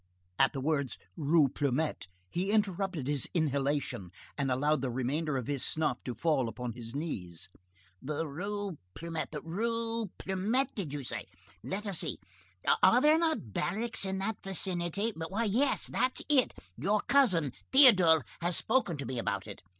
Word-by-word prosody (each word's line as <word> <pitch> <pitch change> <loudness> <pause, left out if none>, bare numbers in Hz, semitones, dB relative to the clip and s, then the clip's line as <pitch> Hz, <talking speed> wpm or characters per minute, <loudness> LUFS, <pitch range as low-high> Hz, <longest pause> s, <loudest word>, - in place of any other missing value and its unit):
At 135 - +4
the 135 - -3
words 140 -2 -1 0.2
"Rue 155 -1 +4
Plumet" 140 - -1 0.2
he 180 - -2
interrupted 195 -8 0
his 145 -3 0
inhalation 140 - 0 0.3
and 140 -2 -1
allowed 145 +3 +1
the 135 - -1
remainder 135 +4 -1
of 125 - -3
his 140 -1 -1
snuff 155 -5 +1
to 125 - -4
fall 135 -1 +1
upon 125 0 -5
his 115 0 -9
knees. 90 - -5 0.5
"The 150 +4 -3
Rue 200 +3 -4 0.2
Plumet, 165 -1 -4
the 150 -2 -5
Rue 230 +4 0
Plumet, 220 +9 0
did 180 -10 -4
you 145 -1 -4
say?—Let 195 - -6
us 195 -4 -2
see!—Are 245 - +1
there 305 +4 +5
not 315 - -1
barracks 220 +6 -1
in 190 0 -1
that 195 +2 -3
vicinity?—Why, 190 +1 -1
yes, 240 +6 +2
that's 255 0 0
it. 275 -4 +3 0.2
Your 200 - +1
cousin 185 - +3 0.2
Théodule 185 - +7 0.2
has 175 0 +1
spoken 220 - +1
to 140 - -5
me 125 0 -3
about 100 -3 -2
it. 100 -2 -9
165 Hz, 150 wpm, -31 LUFS, 135-205 Hz, 0.5 s, Théodule